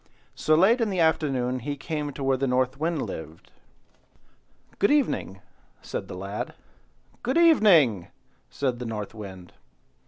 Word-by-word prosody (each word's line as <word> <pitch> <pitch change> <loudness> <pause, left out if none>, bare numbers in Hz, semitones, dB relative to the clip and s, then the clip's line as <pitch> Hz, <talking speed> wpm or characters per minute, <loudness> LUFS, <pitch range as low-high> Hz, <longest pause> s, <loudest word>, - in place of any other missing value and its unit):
So 155 - +2
late 210 +9 +4
in 225 - +1
the 190 -2 -2
afternoon 135 -6 +1
he 145 +4 -4
came 150 +1 -4
to 140 - -6
where 135 0 +2
the 135 +1 -1
North 130 +1 0
Wind 160 -1 -1
lived. 80 +1 -8 1.3
"Good 200 - +3
evening!" 255 - 0 0.4
said - - -5
the - - -8
lad. 100 +2 -5 0.7
"Good 260 +6 0
evening!" 180 - +5 0.4
said 130 -4 -2
the 125 - -5
North 105 -2 -5
Wind. 95 -5 -10
135 Hz, 145 wpm, -26 LUFS, 110-170 Hz, 1.3 s, evening